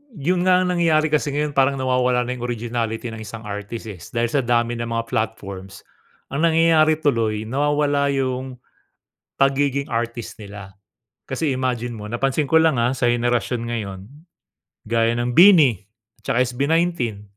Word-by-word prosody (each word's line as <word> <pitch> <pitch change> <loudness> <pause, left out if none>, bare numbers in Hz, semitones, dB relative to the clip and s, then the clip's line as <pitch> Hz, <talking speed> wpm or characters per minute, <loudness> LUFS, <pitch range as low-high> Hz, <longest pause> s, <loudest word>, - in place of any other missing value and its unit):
Yun 175 +4 0
nga 180 0 +5
ang 180 - 0
nangyayari, 160 -3 +2
kasi 150 -1 +1
ngayon 150 +1 -1
parang 135 0 +3
nawawala 125 -1 +1
na 125 - -4
yung 120 -1 -6
originality 115 -1 -3
ng 110 - -8
isang 115 +1 -9
artists, 105 +2 -6
eh, 95 -5 -9 0.2
dahil 115 0 +1
sa 145 - +2
dami 120 0 +1
ng 115 - -3
mga 115 0 -2
platforms. 100 -3 -4 0.5
Ang 155 +4 +2
nangyayari 160 -1 +4
tuloy, 110 -6 +1
nawawala 145 +2 +1
yung 130 -1 -2 0.9
pagiging 140 0 +1
artist 115 0 -4
nila. 100 -2 -10 0.6
Kasi 135 +2 -1
imagine 125 -2 -2
mo, 105 - -8
napansin 135 +6 0
ko 160 +2 +5
lang, 160 -3 +3
ah, 120 +2 +2
sa 125 -1 +1
henerasyon 120 0 0
ngayon 100 -5 -4 0.9
gaya 115 0 +2
ng 120 +1 -1
BINI 165 - +7 0.5
tsaka 125 - +2
SB19. 135 -3 -1
125 Hz, 150 wpm, -21 LUFS, 115-145 Hz, 0.9 s, BINI